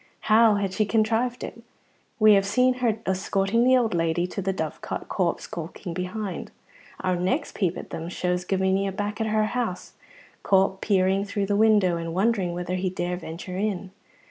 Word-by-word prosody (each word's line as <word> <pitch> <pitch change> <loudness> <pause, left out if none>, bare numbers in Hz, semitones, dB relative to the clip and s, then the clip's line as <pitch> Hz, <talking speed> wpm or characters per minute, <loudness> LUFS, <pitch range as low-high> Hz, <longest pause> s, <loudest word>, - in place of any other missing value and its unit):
How 220 0 +5
had 200 -2 -1
she 215 - +2
contrived 225 +3 +1
it? 230 - -7 0.6
We 215 -1 +7
have 195 -1 +4
seen 250 +6 +3
her 225 -3 +2
escorting 195 +4 +1
the 255 +1 +5
old 235 -5 +1
lady 165 0 +1
to 190 +2 -5
the 195 +1 0
Dovecot, 160 -5 -4
Corp 180 -3 0
skulking 170 +2 -7
behind. 185 +3 -4 0.5
Our 185 -1 +1
next 220 - -1
peep 185 -3 -1
at - - -9
them 165 +1 -5
shows 180 0 -1
Gavinia 190 +1 0
back 210 +2 -3
at 220 - 0
her 215 0 +2
house, 220 -4 -3 0.5
Corp 190 0 +2
peering 195 -1 +2
through 200 0 -2
the 200 +1 0
window 205 -5 +4
and 165 0 -5
wondering 195 -3 +1
whether 180 0 -3
he 185 0 0
dare 180 -1 -2
venture 180 +2 -7
in. 195 -2 -2
195 Hz, 175 wpm, -25 LUFS, 180-215 Hz, 0.6 s, We